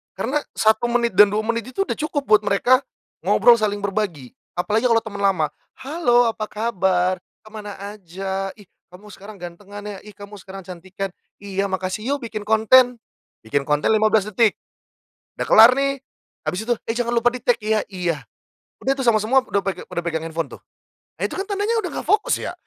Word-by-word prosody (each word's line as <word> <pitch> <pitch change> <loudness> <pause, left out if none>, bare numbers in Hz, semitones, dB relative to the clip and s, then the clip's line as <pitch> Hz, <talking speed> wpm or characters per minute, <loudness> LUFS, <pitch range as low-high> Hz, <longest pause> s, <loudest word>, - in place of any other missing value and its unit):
Karena 230 +10 -1 0.2
1 220 +2 +3
menit 235 -4 0
dan 210 0 +9
2 215 - +1
menit 230 +2 -3
itu 390 - -1
udah - - -4
cukup 300 -2 -2
buat 215 -2 +5
mereka 245 +6 +4 0.5
ngobrol 240 -1 +6
saling 205 -1 -1
berbagi, 195 - -3 0.2
apalagi 210 +7 0
kalau 230 -1 +3
teman 200 -2 -7
lama, 170 -7 +2 0.3
"Halo 260 -4 +2
apa 215 -1 -5
kabar? 185 -5 0 0.3
Kemana 215 -1 -8 0.2
aja? 195 +1 -4
Ih 205 - -16 0.3
kamu 205 +3 -13
sekarang 200 +2 -11
ganteng 175 +4 -10
ya? 205 -1 -7
Ih 210 - -12
kamu 205 0 -11
sekarang 190 +1 -9
cantikan, 190 +2 -6 0.3
'iya 200 0 -2
makasih,' 190 +7 -2
yuk, 285 - -8
bikin 215 -2 -5
konten". 240 +3 +5 0.5
Bikin 140 +6 -1
konten 150 0 +1
15 215 -1 +3
detik, 215 0 +3 0.8
udah - - -2
kelar 225 +3 +9
nih, 275 0 0 0.4
habis 210 +5 -3
itu, 240 - +2 0.2
"Eh - - 0
jangan 240 -1 -1
lupa 240 +1 +3
di 250 - -6
tag 245 - +3
ya? 215 0 +1
'Iya,'." 180 -5 -3 0.6
Udah 270 - +3
tuh 270 - -3
sama 235 -3 +4
semua 260 +5 +3
udah 200 - 0
pe 185 -2 -2
pada - - -7
pegang 165 -2 -3
handphone 165 0 -3
tuh. - - -23 0.6
Nah, - - -8
itu - - -8
kan 390 - -2
tandanya 410 +3 0
udah 360 - -4
enggak - - -6
fokus 430 +6 +3
ya. - - -4
215 Hz, 190 wpm, -22 LUFS, 190-240 Hz, 0.8 s, dan